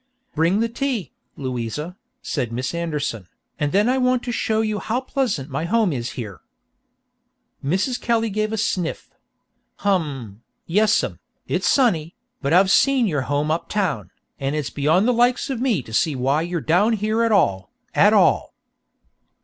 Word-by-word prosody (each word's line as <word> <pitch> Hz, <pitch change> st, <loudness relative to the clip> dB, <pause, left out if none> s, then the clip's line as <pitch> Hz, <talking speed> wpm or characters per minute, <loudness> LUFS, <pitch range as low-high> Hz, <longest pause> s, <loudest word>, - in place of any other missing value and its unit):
"Bring 170 Hz, +7 st, +2 dB
the 230 Hz, -, +2 dB
tea, 235 Hz, -, -3 dB, 0.3 s
Louisa," 130 Hz, +5 st, -4 dB, 0.3 s
said 120 Hz, -, -2 dB
Miss 125 Hz, +4 st, -3 dB
Anderson, 150 Hz, -, -3 dB, 0.3 s
"and 145 Hz, -2 st, 0 dB
then 205 Hz, +4 st, +3 dB
I 260 Hz, +1 st, +2 dB
want 250 Hz, -1 st, +2 dB
to 245 Hz, -, -3 dB
show 220 Hz, -1 st, 0 dB
you 215 Hz, -1 st, -1 dB
how 235 Hz, +3 st, -1 dB
pleasant 255 Hz, -, -1 dB
my 145 Hz, +5 st, -2 dB
home 215 Hz, -2 st, +2 dB
is 120 Hz, -2 st, -4 dB
here." 105 Hz, -6 st, -7 dB, 1.2 s
Mrs. 190 Hz, -, 0 dB
Kelly 230 Hz, -2 st, +1 dB
gave 215 Hz, +1 st, -1 dB
a 220 Hz, -, -2 dB
sniff. 185 Hz, -5 st, -2 dB, 0.7 s
"Hum, 140 Hz, -, -1 dB, 0.2 s
yessum, 210 Hz, +5 st, +2 dB, 0.3 s
it's -, -, 0 dB
sunny, 175 Hz, -, +2 dB, 0.3 s
but 140 Hz, -1 st, -1 dB
I've 190 Hz, +3 st, +5 dB
seen 270 Hz, 0 st, +4 dB
your 150 Hz, -9 st, 0 dB
home 145 Hz, +2 st, 0 dB
up 165 Hz, -, -2 dB
town, 175 Hz, -, -1 dB, 0.3 s
and 135 Hz, +2 st, -1 dB
it's 150 Hz, -3 st, -3 dB
beyond 160 Hz, +9 st, +2 dB
the 250 Hz, -, +3 dB
likes 245 Hz, +3 st, +2 dB
of 250 Hz, -3 st, -3 dB
me 230 Hz, -, +1 dB
to 110 Hz, -, -12 dB
see 155 Hz, +5 st, +2 dB
why 135 Hz, +4 st, +1 dB
you're 170 Hz, 0 st, -2 dB
down 180 Hz, -, +3 dB
here 215 Hz, +1 st, 0 dB
at 230 Hz, -1 st, +2 dB
all, 95 Hz, -, +2 dB, 0.2 s
at -, -, +5 dB
all." -, -, +3 dB
180 Hz, 165 wpm, -22 LUFS, 140-225 Hz, 1.2 s, I've